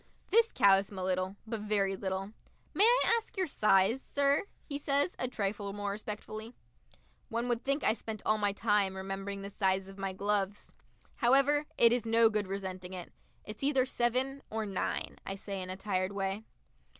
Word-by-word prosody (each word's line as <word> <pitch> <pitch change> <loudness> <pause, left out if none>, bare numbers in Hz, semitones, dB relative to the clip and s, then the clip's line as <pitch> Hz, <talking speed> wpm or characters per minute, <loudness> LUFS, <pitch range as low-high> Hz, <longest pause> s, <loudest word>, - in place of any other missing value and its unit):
This 460 +3 +5
cows 195 0 +5
him 200 - -10
a 185 - -3
little, 185 +1 -1
but 225 0 -4
very 205 -2 0
little. 190 +1 -3 0.4
"May 410 - +5
I 480 0 +5
ask 445 - -16
your 375 - +2
size, 215 - +3
sir?" 280 +5 +1 0.2
he 285 -2 -4
says, 285 +4 +1
a 255 - 0
trifle 200 -3 -2
more 205 0 -3
respectfully. 215 +2 -6 0.7
One 235 +1 -1
would 240 -1 -1
think 275 +2 0
I - - +4
spent 220 -1 -7
all 215 0 +2
my 205 -1 +2
time 205 -2 +1
remembering 195 +1 -5
the 200 - -6
size 190 -1 +1
of 195 0 -12
my 195 0 -2
gloves. 200 +1 -1 0.4
However, 275 +4 +3
it 235 0 +6
is 240 -2 0
no 225 0 +5
good 210 -2 -1
resenting 190 -1 -5
it. 180 -2 -7 0.3
"It's 215 0 -8
either 275 -2 +3
seven 255 +2 0
or 220 0 -2
nine," 195 -2 -3
I 195 - -4
say 195 -1 -5
in 185 - -5
a 185 - -4
tired 190 -1 -1
way. 195 +2 -2
210 Hz, 185 wpm, -32 LUFS, 195-240 Hz, 0.7 s, it